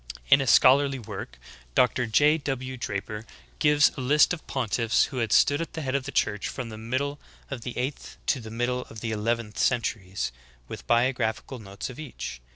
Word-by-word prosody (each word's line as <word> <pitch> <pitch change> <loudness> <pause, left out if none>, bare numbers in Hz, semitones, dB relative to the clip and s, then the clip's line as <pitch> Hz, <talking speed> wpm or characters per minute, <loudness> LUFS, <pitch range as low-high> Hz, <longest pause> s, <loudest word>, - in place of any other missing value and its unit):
In 140 - +8
a 135 - -2
scholarly 135 +3 +5
work 115 - -8 0.4
Dr. 125 -1 +3
J. 150 +8 +4
W. 130 -2 -4
Draper 105 -2 -4 0.4
gives 150 -1 +5
a 135 - -5
list 150 +6 +4
of 170 - -7
pontiffs 115 -3 +1
who 130 - -7
had 115 -4 -1
stood 145 +2 +4
at 165 - -5
the 160 - -4
head 130 -1 -2
of 140 -1 0
the 140 - -5
Church 105 -6 0
from 125 -3 -5
the 110 - -8
middle 135 +6 -2 0.3
of 135 -4 -4
the 120 +1 -6
eighth 130 +3 -4
to 135 - +1
the 110 -2 -9
middle 120 +2 -1
of 110 -1 -11
the 115 - -2
eleventh 110 0 -2
centuries, 105 -6 0 0.4
with - - -9
biographical 120 0 +1
notes 100 +3 -7
of 125 - -12
each. 120 - -7
125 Hz, 190 wpm, -26 LUFS, 110-140 Hz, 0.4 s, In